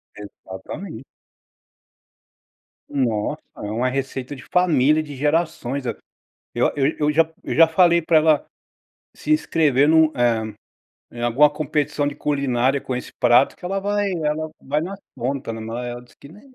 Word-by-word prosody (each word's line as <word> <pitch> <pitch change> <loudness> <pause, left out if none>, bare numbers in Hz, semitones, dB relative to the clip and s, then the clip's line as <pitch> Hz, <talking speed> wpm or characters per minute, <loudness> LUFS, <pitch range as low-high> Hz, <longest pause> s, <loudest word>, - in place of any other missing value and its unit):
Exatamente. 105 - -9 1.9
Nossa, 115 -6 -1 0.2
é - - -9
uma 125 +3 0
receita 135 0 -4
de 130 - -12
família 155 -4 +3
de 150 -2 -8
gerações 145 -2 -1
a 115 - -2 0.6
eu - - +2
eu 140 - +1
já - - -14
eu 150 0 +2
já 160 +1 +2
eu - - -3
já 165 0 +6
falei 170 0 +4
para 160 0 +2
ela 155 -1 +3 0.7
se - - -7
inscrever 150 - +3
em - - +4
um, 160 0 +6
eh, 120 -1 +3 0.7
em 120 - -10
alguma 130 +5 +4
competição 150 -1 -1
de 145 - -2
culinária 135 -2 0
com 130 - -4
esse 125 - -6
prato 120 +2 +4
que - - -16
ela 195 +2 -2
vai 205 0 0
ela 155 -2 -2
vai 150 +3 -1
na 185 +4 -5 0.2
conta, 130 -1 -3
né, 110 - -6 0.3
ela 120 0 -7
diz 125 - -21
que, 140 - -15
nã 175 +8 -15
145 Hz, 165 wpm, -22 LUFS, 125-160 Hz, 1.9 s, já